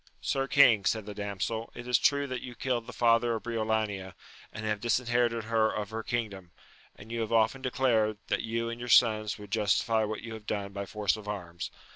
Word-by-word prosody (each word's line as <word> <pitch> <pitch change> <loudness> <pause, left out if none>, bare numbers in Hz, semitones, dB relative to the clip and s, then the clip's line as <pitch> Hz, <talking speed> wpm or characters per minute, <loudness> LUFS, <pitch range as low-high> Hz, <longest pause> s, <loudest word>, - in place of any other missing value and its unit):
Sir 135 0 -1
king, 120 -9 +6
said 110 +1 0
the 105 - -6
damsel, 105 +3 -3
it 120 0 -8
is 125 -1 +3
true 140 0 +3
that 130 -2 -4
you 125 -1 -8
killed 120 -3 -2
the - - -6
father 115 0 +3
of 110 - -5
Briolania, 110 -5 -2 0.4
and 110 - -6
have 105 -1 -1
disherited 120 0 +1
her 110 0 +2
of 105 -1 -4
her 110 0 -3
kingdom; 105 -7 -3 0.5
and 110 - -13
you 115 0 -2
have 110 - -3
often 115 +4 +2
declared, 120 -5 +1
that - - 0
you 115 +1 -2
and 115 0 -5
your 120 0 -6
sons 110 -3 +4
would 105 -2 -11
justify 110 +1 +2
what 110 0 -4
you 115 -1 -6
have 110 -1 -10
done 100 -1 -3
by 100 0 -5
force 105 -3 0
of 105 -1 -11
arms. 85 -5 -5
110 Hz, 210 wpm, -29 LUFS, 105-120 Hz, 0.5 s, king